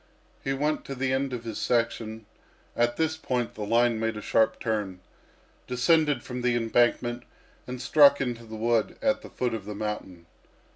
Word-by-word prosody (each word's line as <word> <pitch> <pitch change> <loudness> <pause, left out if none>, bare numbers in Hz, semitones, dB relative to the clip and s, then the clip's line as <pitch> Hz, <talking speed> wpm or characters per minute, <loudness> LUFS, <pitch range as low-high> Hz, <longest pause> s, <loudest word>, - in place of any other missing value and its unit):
He 135 - -1
went 150 +3 0
to 135 - -5
the 130 0 0
end 135 0 0
of 120 -2 -5
his 115 -2 -5
section 115 -2 -1 0.5
at 120 0 +1
this 160 0 0
point 125 -6 -2
the - - -9
line 115 +2 +2
made 110 -1 -1
a - - -5
sharp 110 - +2
turn 105 -5 -2 0.7
descended 150 +4 +2
the 125 -1 -1
embankment, 120 +1 +1 0.5
and 125 0 -5
struck 140 +2 +6
into 120 -3 -3
the 110 0 -8
wood 115 0 0
at 275 -1 +1
the - - -11
foot 125 -2 -2
of 110 -4 -5
the 105 0 -6
mountain. 100 -5 -5
120 Hz, 175 wpm, -27 LUFS, 110-130 Hz, 0.7 s, struck